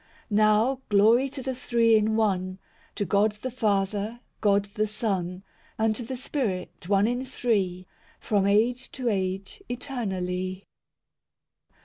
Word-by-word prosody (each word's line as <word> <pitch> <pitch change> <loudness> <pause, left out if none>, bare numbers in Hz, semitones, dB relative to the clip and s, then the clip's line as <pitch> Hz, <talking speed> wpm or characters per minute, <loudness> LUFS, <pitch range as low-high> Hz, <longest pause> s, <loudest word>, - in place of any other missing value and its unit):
VI - - +1
Now, 215 +5 +3
glory 225 +6 +5
to 265 0 -7
the 265 - -2
Three 235 -2 +3
in 215 0 +2
One, 185 -4 0 0.4
To 205 - -1
God 205 +2 +2
the 260 - -2
Father, 210 0 -1 0.2
God 200 -1 +3
the 215 0 0
Son, 190 -4 -2 0.3
And 220 0 +2
to - - -5
the 250 +2 -5
Spirit, 205 - -3
one 200 0 +4
in 245 +3 0
Three, 200 -8 -1 0.3
From 200 -2 +1
age 235 +5 +2
to 255 -3 -1
age 190 - -2
eternally. 190 -7 -3
215 Hz, 135 wpm, -26 LUFS, 195-240 Hz, 0.4 s, glory